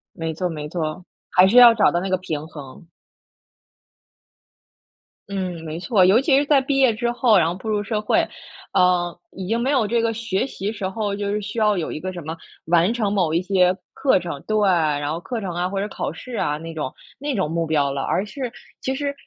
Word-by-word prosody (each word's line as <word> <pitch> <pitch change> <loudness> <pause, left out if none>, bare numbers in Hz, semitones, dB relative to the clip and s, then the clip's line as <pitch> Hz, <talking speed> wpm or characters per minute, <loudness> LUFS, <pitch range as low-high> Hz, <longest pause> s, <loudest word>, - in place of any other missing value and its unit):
没 165 -1 -3
错 180 +3 -2
没 150 -2 -5
错。 165 +1 -4 0.2
还 185 +1 +5
是 205 - +1
要 240 -2 +10
找 220 -2 +3
到 175 - 0
那 190 +2 -3
个 185 - +2
平 155 -4 -5
衡。 145 +2 -11 2.4
嗯， 185 -4 -4
没 155 0 -5
错。 190 +1 +3
尤 205 +7 +5
其 270 -1 +3
是 285 - +2
在 285 -2 +4
毕 270 +1 -1
业 260 -4 +5
之 235 +2 -1
后， 240 -3 +4
然 170 - +4
后 170 - -1
步 190 +4 -9
入 210 -1 0
社 210 +1 -2
会， 210 - +2 0.5
呃， 180 -2 +2
已 190 - -7
经 225 +5 0
没 255 +4 0
有 255 -7 +2
这 230 +2 +1
个 230 0 0
学 225 +1 -2
习 205 -5 -4
时 200 -3 -4
候， 205 +1 -2
就 200 0 -3
是 210 +1 -1
需 205 +3 -5
要 210 -3 +3
有 165 - -3
一 - - -5
个 185 +2 -5
什 175 - -7
么， 160 +1 -5 0.3
完 170 +5 +3
成 215 -4 -1
某 180 -6 +1
一 170 - +2
些 185 -1 +3 0.2
课 265 -9 +2
程 165 -5 -6
对， 215 - +1
然 150 -4 +1
后 165 - -3
课 230 +4 -5
程 185 -3 -4
啊， 175 +1 -1
或 195 +1 -3
者 205 - -2
考 - - -4
试 245 +9 -8
啊， 150 -8 -1
那 165 +1 -8
种 150 -5 -4 0.3
那 285 -1 -2
种 185 -7 -1
目 165 0 0
标 145 -3 +1
了。 135 -1 -3
而 195 - 0
是 255 +3 -5 0.3
其 265 - -2
实， 285 0 -2
190 Hz, 245 characters per minute, -22 LUFS, 165-225 Hz, 2.4 s, 要